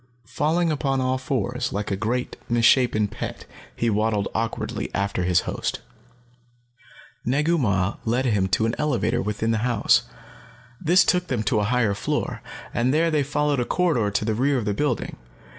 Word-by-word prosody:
Falling 165 Hz, +5 st, +1 dB
upon 135 Hz, -3 st, 0 dB
all 130 Hz, 0 st, 0 dB
fours, 130 Hz, -6 st, -2 dB
like 105 Hz, +2 st, -3 dB
a -, -, +1 dB
great, 120 Hz, +5 st, -2 dB
misshapen 120 Hz, -2 st, +3 dB
pet, -, -, -6 dB, 0.3 s
he 120 Hz, -, -1 dB
waddled 105 Hz, -1 st, +1 dB
awkwardly 115 Hz, 0 st, -3 dB
after 100 Hz, -2 st, -1 dB
his 90 Hz, -1 st, +3 dB
host. -, -, -3 dB, 1.4 s
Negu 150 Hz, +7 st, +1 dB
Mah 100 Hz, -6 st, 0 dB
led 120 Hz, +4 st, 0 dB
him 105 Hz, -6 st, +2 dB
to 95 Hz, +4 st, +1 dB
an 115 Hz, -, 0 dB
elevator 150 Hz, -5 st, 0 dB
within 105 Hz, +2 st, -1 dB
the 110 Hz, -, +1 dB
house. 120 Hz, -2 st, +3 dB, 0.8 s
This 180 Hz, +3 st, +5 dB
took 180 Hz, 0 st, +1 dB
them 125 Hz, -7 st, -1 dB
to 105 Hz, +1 st, +1 dB
a 105 Hz, -, +1 dB
higher 115 Hz, -2 st, +1 dB
floor, -, -, -2 dB, 0.3 s
and 120 Hz, +2 st, +1 dB
there 165 Hz, +3 st, +2 dB
they 150 Hz, -2 st, +2 dB
followed 145 Hz, 0 st, 0 dB
a -, -, +2 dB
corridor 155 Hz, -, +1 dB
to 100 Hz, +1 st, -1 dB
the 110 Hz, -, 0 dB
rear 135 Hz, +5 st, +1 dB
of 115 Hz, -, -2 dB
the 105 Hz, -, 0 dB
building. 130 Hz, +2 st, -2 dB
120 Hz, 170 wpm, -24 LUFS, 105-140 Hz, 1.4 s, This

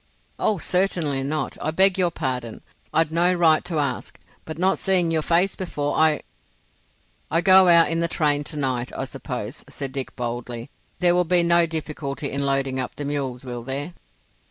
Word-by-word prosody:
"Oh, 210 Hz, -, +1 dB
certainly 170 Hz, -6 st, 0 dB
not. 150 Hz, +3 st, -2 dB
I 155 Hz, -, -1 dB
beg 190 Hz, +4 st, +4 dB
your 180 Hz, -2 st, +2 dB
pardon. 130 Hz, -8 st, -4 dB, 0.3 s
I'd 160 Hz, 0 st, +2 dB
no 170 Hz, +2 st, +3 dB
right 160 Hz, -3 st, +4 dB
to 170 Hz, -3 st, -2 dB
ask, 140 Hz, -4 st, -3 dB, 0.3 s
but 160 Hz, -1 st, -7 dB
not 185 Hz, +3 st, +1 dB
seeing 180 Hz, -3 st, +2 dB
your 160 Hz, -1 st, +1 dB
face 175 Hz, +5 st, +2 dB
before 145 Hz, -6 st, -3 dB
I——" 155 Hz, -1 st, +3 dB, 1.1 s
"I 165 Hz, -, +2 dB
go 190 Hz, 0 st, +7 dB
out 170 Hz, -1 st, +7 dB
in 165 Hz, -, 0 dB
the 170 Hz, -, +1 dB
train 150 Hz, -3 st, +1 dB
to 150 Hz, -, -4 dB
night, 130 Hz, -3 st, -1 dB
I 135 Hz, -, -2 dB
suppose," 125 Hz, -2 st, -6 dB
said 135 Hz, -2 st, -5 dB
Dick, 135 Hz, -1 st, -5 dB
boldly. 120 Hz, +1 st, -5 dB, 0.3 s
"There 175 Hz, -1 st, +3 dB
will 180 Hz, 0 st, +3 dB
be 175 Hz, 0 st, +2 dB
no 170 Hz, 0 st, +4 dB
difficulty 150 Hz, -3 st, -4 dB
in 140 Hz, 0 st, -1 dB
loading 135 Hz, -1 st, 0 dB
up 130 Hz, -, -4 dB
the 145 Hz, -, -5 dB
mules, 135 Hz, -3 st, -3 dB
will 120 Hz, -1 st, -5 dB
there?" 140 Hz, +7 st, -4 dB
155 Hz, 180 wpm, -23 LUFS, 135-170 Hz, 1.1 s, go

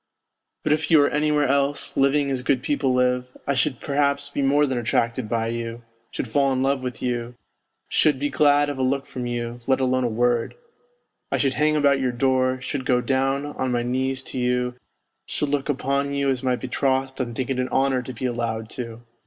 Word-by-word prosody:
But 150 Hz, -, +3 dB
if 150 Hz, 0 st, -1 dB
you 160 Hz, -, +7 dB
were 145 Hz, -1 st, +5 dB
anywhere 150 Hz, 0 st, +2 dB
else, 140 Hz, +1 st, 0 dB
living 140 Hz, +1 st, +2 dB
as 130 Hz, -2 st, -1 dB
good 130 Hz, 0 st, +1 dB
people 140 Hz, -2 st, +1 dB
live, 125 Hz, 0 st, +1 dB, 0.2 s
I 140 Hz, -, +1 dB
should 130 Hz, -1 st, 0 dB
perhaps 140 Hz, 0 st, 0 dB
be 145 Hz, -, -2 dB
more 145 Hz, +2 st, +3 dB
than 130 Hz, -3 st, -1 dB
attracted 115 Hz, 0 st, 0 dB
by 115 Hz, -1 st, 0 dB
you, 115 Hz, 0 st, -5 dB, 0.3 s
should -, -, -4 dB
fall 135 Hz, +4 st, +2 dB
in 130 Hz, 0 st, 0 dB
love 135 Hz, 0 st, +1 dB
with 125 Hz, -3 st, -5 dB
you, 120 Hz, -1 st, -2 dB, 0.5 s
should 150 Hz, -3 st, +3 dB
be 145 Hz, +2 st, -1 dB
glad 145 Hz, 0 st, +4 dB
of 145 Hz, -2 st, -4 dB
a -, -, 0 dB
look 135 Hz, +1 st, 0 dB
from 125 Hz, -1 st, -5 dB
you, 120 Hz, 0 st, -4 dB
let 135 Hz, 0 st, +3 dB
alone 130 Hz, -1 st, +1 dB
a -, -, +2 dB
word; 120 Hz, +1 st, 0 dB, 0.8 s
I -, -, +2 dB
should 135 Hz, -2 st, +1 dB
hang 155 Hz, +1 st, +2 dB
about 140 Hz, -2 st, +3 dB
your 130 Hz, -1 st, 0 dB
door, 130 Hz, +1 st, +1 dB
should 130 Hz, +1 st, -3 dB
go 125 Hz, -1 st, +2 dB
down 135 Hz, +2 st, 0 dB
on 130 Hz, -3 st, -3 dB
my 120 Hz, -1 st, 0 dB
knees 130 Hz, +2 st, -1 dB
to 130 Hz, -, -4 dB
you, 125 Hz, 0 st, 0 dB, 0.5 s
should 150 Hz, -, -2 dB
look 145 Hz, 0 st, -1 dB
upon 140 Hz, 0 st, 0 dB
you 140 Hz, -1 st, +1 dB
as 130 Hz, -2 st, -2 dB
my 130 Hz, -1 st, +1 dB
be 130 Hz, -, -6 dB
trothed 135 Hz, +1 st, 0 dB
and 120 Hz, -3 st, -3 dB
think 130 Hz, +1 st, -2 dB
it 130 Hz, -, -1 dB
an 125 Hz, 0 st, -1 dB
honour 135 Hz, -1 st, +2 dB
to 125 Hz, -, -7 dB
be 125 Hz, +2 st, -5 dB
allowed 115 Hz, -2 st, -2 dB
to. 115 Hz, -2 st, -7 dB
130 Hz, 215 wpm, -23 LUFS, 125-140 Hz, 0.8 s, you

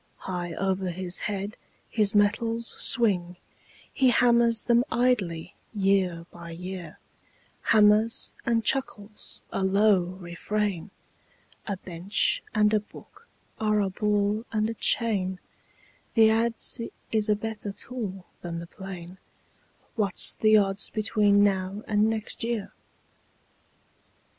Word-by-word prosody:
High 175 Hz, -2 st, -4 dB
over 190 Hz, -1 st, -1 dB
his 180 Hz, 0 st, -4 dB
head 205 Hz, 0 st, -4 dB, 0.3 s
his 210 Hz, -2 st, +1 dB
metals 225 Hz, +3 st, +2 dB, 0.2 s
swing; 185 Hz, -7 st, +2 dB, 0.6 s
He 265 Hz, -2 st, +4 dB
hammers 235 Hz, -1 st, +4 dB
them 240 Hz, 0 st, +3 dB
idly 205 Hz, -10 st, 0 dB, 0.2 s
year 190 Hz, -4 st, +1 dB
by 170 Hz, -1 st, -10 dB
year, 180 Hz, -1 st, -7 dB, 0.7 s
Hammers 215 Hz, +2 st, +4 dB
and 230 Hz, -2 st, 0 dB
chuckles 215 Hz, -6 st, -2 dB
a 195 Hz, -, -2 dB
low 195 Hz, 0 st, +4 dB
refrain: 185 Hz, +2 st, -3 dB, 0.8 s
"A 200 Hz, -3 st, -2 dB
bench 185 Hz, +2 st, -1 dB
and 210 Hz, 0 st, +3 dB
a 215 Hz, -, +4 dB
book 210 Hz, -, -16 dB, 0.3 s
are 215 Hz, -1 st, +2 dB
a 195 Hz, -2 st, 0 dB
ball 210 Hz, +1 st, 0 dB
and 215 Hz, 0 st, 0 dB
a -, -, -4 dB
chain, 200 Hz, -5 st, +1 dB, 0.8 s
The 220 Hz, -1 st, +6 dB
adze 230 Hz, +1 st, -1 dB, 0.2 s
is 215 Hz, -1 st, 0 dB
a 210 Hz, -, +4 dB
better 210 Hz, -1 st, -5 dB
tool 195 Hz, -5 st, -6 dB, 0.2 s
than 170 Hz, -1 st, -5 dB
the 170 Hz, -, -6 dB
plane; 185 Hz, -1 st, -9 dB, 0.8 s
What's 200 Hz, -4 st, +3 dB
the 215 Hz, 0 st, +4 dB
odds 195 Hz, -1 st, 0 dB
between 210 Hz, -2 st, +3 dB
now 195 Hz, +1 st, 0 dB
and 210 Hz, +1 st, +2 dB
next 220 Hz, 0 st, -3 dB
year?" 230 Hz, -3 st, -3 dB
205 Hz, 120 wpm, -26 LUFS, 185-220 Hz, 0.8 s, The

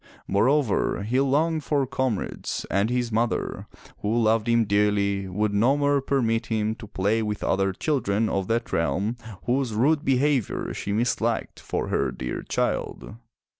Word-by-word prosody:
Moreover, 115 Hz, 0 st, +2 dB
he 120 Hz, +5 st, +1 dB
longed 150 Hz, +4 st, +1 dB
for 140 Hz, -2 st, +1 dB
comrades, 130 Hz, -5 st, -2 dB
and 100 Hz, +3 st, +2 dB
his 125 Hz, -1 st, -1 dB
mother, 115 Hz, +2 st, -1 dB, 0.3 s
who 110 Hz, +3 st, 0 dB
loved 110 Hz, 0 st, +2 dB
him 115 Hz, -1 st, +3 dB
dearly, 100 Hz, -1 st, +1 dB
would 105 Hz, +3 st, -1 dB
no 120 Hz, +8 st, +3 dB
more 145 Hz, -1 st, +2 dB
permit 115 Hz, -4 st, 0 dB
him 110 Hz, -1 st, 0 dB
to 110 Hz, -, -10 dB
play 105 Hz, +2 st, 0 dB
with 105 Hz, -1 st, -3 dB
other 95 Hz, 0 st, +1 dB
children 110 Hz, -2 st, 0 dB
of 95 Hz, -2 st, -1 dB
that 115 Hz, +1 st, -1 dB
realm, 100 Hz, +7 st, 0 dB, 0.3 s
whose 125 Hz, -2 st, 0 dB
rude 145 Hz, +7 st, +2 dB
behavior 135 Hz, -2 st, +1 dB
she 100 Hz, -, -4 dB
misliked 115 Hz, +1 st, 0 dB
for -, -, -3 dB
her 70 Hz, -2 st, 0 dB
dear 60 Hz, 0 st, -4 dB
child. -, -, -2 dB
115 Hz, 150 wpm, -25 LUFS, 100-130 Hz, 0.3 s, him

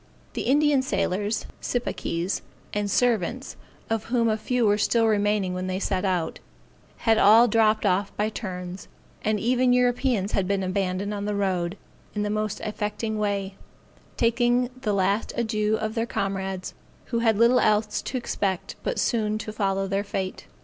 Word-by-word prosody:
The -, -, -3 dB
Indian 290 Hz, 0 st, +4 dB
sailors, 205 Hz, -2 st, -1 dB, 0.2 s
sipakees, 185 Hz, -7 st, -2 dB, 0.3 s
and 205 Hz, 0 st, -1 dB
servants, 240 Hz, +2 st, 0 dB, 0.3 s
of 225 Hz, -1 st, -1 dB
whom 230 Hz, -1 st, +1 dB
a 215 Hz, -, +2 dB
few 240 Hz, +2 st, 0 dB
were 205 Hz, 0 st, +3 dB
still 230 Hz, +2 st, +3 dB
remaining 205 Hz, -3 st, +1 dB
when 185 Hz, 0 st, -3 dB
they 185 Hz, 0 st, -1 dB
set 190 Hz, -1 st, -1 dB
out, 180 Hz, -4 st, -1 dB, 0.7 s
had 225 Hz, -1 st, +4 dB
all 225 Hz, +4 st, +7 dB
dropped 220 Hz, -1 st, +3 dB
off 195 Hz, +1 st, +1 dB
by 210 Hz, +1 st, +1 dB
turns; 180 Hz, -4 st, -6 dB, 0.4 s
and 215 Hz, 0 st, +1 dB
even 250 Hz, +2 st, +3 dB
Europeans 245 Hz, -4 st, +2 dB
had 190 Hz, -2 st, 0 dB
been 195 Hz, -1 st, 0 dB
abandoned 190 Hz, +2 st, -1 dB
on 205 Hz, 0 st, -3 dB
the 210 Hz, 0 st, -1 dB
road, 190 Hz, -2 st, -1 dB, 0.4 s
in 210 Hz, -, 0 dB
the 210 Hz, -, -1 dB
most 215 Hz, -1 st, -2 dB
affecting 215 Hz, +1 st, -3 dB
way, 200 Hz, -2 st, -1 dB, 0.6 s
taking 240 Hz, +1 st, +2 dB
a 210 Hz, -, +1 dB
last 200 Hz, +2 st, +1 dB
adieu 215 Hz, -2 st, +1 dB
of 220 Hz, 0 st, -3 dB
their 230 Hz, 0 st, -1 dB
comrades, 190 Hz, -3 st, -3 dB, 0.4 s
who 235 Hz, -, +2 dB
had 225 Hz, -3 st, +3 dB
little 235 Hz, +3 st, +5 dB
else 210 Hz, -1 st, +2 dB
to 260 Hz, -, -3 dB
expect 195 Hz, -6 st, -2 dB
but -, -, -2 dB
soon 215 Hz, -3 st, +1 dB
to 215 Hz, 0 st, -6 dB
follow 195 Hz, -2 st, 0 dB
their 195 Hz, +1 st, 0 dB
fate. 190 Hz, -2 st, -4 dB
210 Hz, 165 wpm, -25 LUFS, 195-230 Hz, 0.7 s, all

